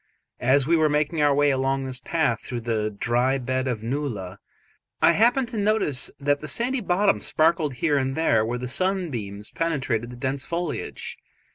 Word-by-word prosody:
As 130 +2 +3
we 170 +3 +3
were 155 -1 +3
making 150 +2 0
our 145 -1 +4
way 145 0 +4
along 135 0 0
this 130 -1 -2
path 150 -6 0
through 120 -2 -5
the 110 -2 -1
dry 120 +5 0
bed 130 +1 -2
of 115 -4 -2
a - - -6
nullah, 115 -8 -3 0.6
I - - +6
happened 240 - +3
to 235 - -5
notice 205 -10 +1
that 145 0 +1
the 155 - -6
sandy 250 +7 0
bottom 195 +1 +2
sparkled 155 -3 +1
here 145 +3 +1
and 135 0 -1
there 115 -9 +3
where 120 +2 -2
the 125 +1 -5
sunbeams 130 - -2
penetrated 135 -8 -1
the 125 - -9
dense 135 +1 -1
foliage. 170 -1 -4
140 Hz, 180 wpm, -24 LUFS, 125-165 Hz, 0.6 s, I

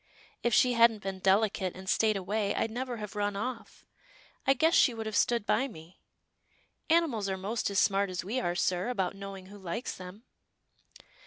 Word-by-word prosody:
If 240 - +1
she 250 +3 +4
hadn't 230 -3 +4
been 190 -1 -4
delicate, 195 -1 +1
and 190 +1 -10
stayed 215 +1 +2
away, 200 +2 -1
I'd 225 - -1
never 245 +1 -4
have 210 -2 -7
run 205 -1 -1
off. 230 +2 -6 0.6
I 270 - +5
guess 320 +5 +3
she 245 - +5
would 225 -1 -5
have 220 -1 -4
stood 235 0 +2
by 265 +5 +2
me 165 -6 -13 0.5
— - - -39
Animals 295 -12 +2
are 190 - -2
most 205 +5 -2
as 200 - -3
smart 200 -1 +3
as 180 -1 -4
we 230 +7 -1
are, 175 -8 -1
sir, 180 +3 0
about 195 -6 -1
knowing 195 -1 -8
who 205 +2 -12
likes 190 +6 -4
them." 185 +4 -10
205 Hz, 190 wpm, -30 LUFS, 190-235 Hz, 0.6 s, I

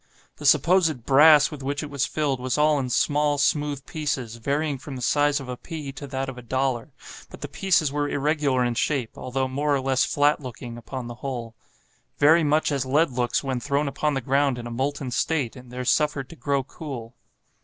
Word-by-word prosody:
The 145 - -2
supposed 155 -3 +3
brass 150 +2 +6
with 150 -2 -8
which 140 +3 -2
it 150 - -7
was 140 0 0
filled 145 -4 -1
was 125 0 -1
all 150 -1 +3
in 130 -2 -2
small, 145 +3 +2
smooth 145 -1 0
pieces, 130 -7 -3
varying 140 +4 -1
from 135 +1 -8
the 125 - -6
size 145 +2 +2
of 135 - -8
a 125 - -4
pea 150 0 -7
to 140 +1 -8
that 135 0 -3
of 130 -2 -7
a - - -9
dollar; 130 +2 -1 0.4
but - - -12
the 145 - -4
pieces 155 -1 +1
were 145 0 -1
irregular 145 -3 +1
in 120 - 0
shape, 125 -1 -1
although 130 +1 -2
more 145 +2 0
or - - +1
less 130 0 +1
flat 145 +1 +2
looking, 125 -3 -8
upon 120 +2 -7
the 120 - -6
whole, 120 -5 -5 0.6
"very 160 +3 +5
much 150 +1 +2
as 140 -2 0
lead 145 +4 +2
looks 125 0 0
when 130 -2 -2
thrown 140 +3 0
upon 150 +1 -1
the 135 - -1
ground 135 +1 +1
in 120 - -7
a 120 - -6
molten 135 +1 -2
state, 135 -1 0
and 125 -1 -13
there 125 0 -5
suffered 140 -1 +1
to - - -11
grow 140 -3 -1
cool." 130 -4 -8
140 Hz, 210 wpm, -24 LUFS, 130-150 Hz, 0.6 s, brass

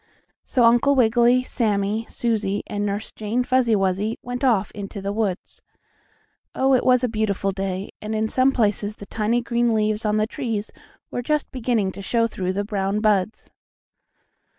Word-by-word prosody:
So 250 - +1
Uncle 240 +4 +5
Wiggily, 240 +1 +4
Sammie, 215 -2 -1
Susie 215 -4 -1
and 205 -1 -3
Nurse 205 0 -3
Jane 220 +4 -2
Fuzzy 245 -3 +2
Wuzzy 195 +3 0
went 245 +2 -5
off 220 -7 +2
into 200 0 -7
the 200 +1 -3
woods. 205 -4 -3 0.9
Oh, 265 0 +3
it 255 - +3
was 255 -1 +4
a - - +3
beautiful 215 -3 -1
day, 195 0 -4
and 215 +1 -3
in 220 0 0
some 260 +4 +3
places 210 -4 0
the 200 - -10
tiny 225 +4 0
green 235 -1 +1
leaves 215 0 0
on 210 0 +1
the 215 - +2
trees 225 -4 -4 0.4
were 245 - -2
just 300 +4 -1
beginning 230 -6 0
to 195 - -9
show 230 +4 +1
through 185 -4 -3
the 200 +2 -1
brown 200 -1 -1
buds. 210 -1 0
220 Hz, 170 wpm, -23 LUFS, 205-240 Hz, 0.9 s, Uncle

